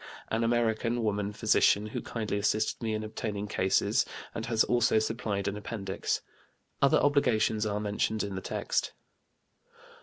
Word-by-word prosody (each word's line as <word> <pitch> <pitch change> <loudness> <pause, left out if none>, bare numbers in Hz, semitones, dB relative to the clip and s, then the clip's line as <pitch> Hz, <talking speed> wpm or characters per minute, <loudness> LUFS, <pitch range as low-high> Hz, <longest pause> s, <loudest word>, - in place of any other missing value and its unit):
an 115 +1 0
American 115 0 +1
woman 105 -1 0
physician, 105 -1 +3
who 110 - -4
kindly 105 -3 -3
assisted 110 +3 0
me 110 -2 -1
in 110 - -3
obtaining 105 -1 -4
cases, 95 -2 +2 0.3
and 115 0 -4
has 115 -1 +3
also 120 -2 +3
supplied 110 -3 -1
an 100 - -1
appendix. 100 -2 -3 0.6
Other 140 - +5
obligations 110 -7 +2
are 105 0 -1
mentioned 105 +1 -1
in 100 -1 -4
the 95 - -4
text. - - -2
110 Hz, 145 wpm, -29 LUFS, 105-115 Hz, 0.6 s, Other